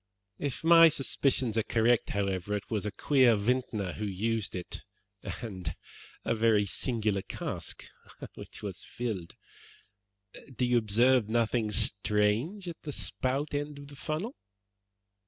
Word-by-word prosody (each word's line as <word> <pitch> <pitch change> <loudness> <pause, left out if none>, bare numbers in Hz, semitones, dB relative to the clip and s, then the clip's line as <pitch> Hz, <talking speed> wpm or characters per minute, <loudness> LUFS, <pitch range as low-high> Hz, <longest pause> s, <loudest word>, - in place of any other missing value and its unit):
If 145 +1 -3
my 165 0 +8
suspicions 130 -5 +1
are - - +3
correct, 115 +2 +2
however, 100 0 -1
it 105 - -6
was 105 -2 -1
a - - -2
queer 130 +1 +4
vintner 105 -3 -1
who 105 - -4
used 105 +2 -1
it, 90 - -5 0.4
and 95 -7 -5 0.5
a - - +2
very 110 -2 +3
singular 105 -1 0
cask - - -6 0.5
which - - -10
was - - -5
filled. 110 -8 -5 1.2
Do 125 - +1
you 120 -1 +4
observe 115 +2 +3
nothing 115 -1 +1
strange 105 - +2
at 170 -1 -7
the 150 - -5
spout 135 +2 -2
end 145 0 -3
of 140 0 -10
the 145 - -11
funnel." 160 - -3
115 Hz, 135 wpm, -30 LUFS, 105-135 Hz, 1.2 s, my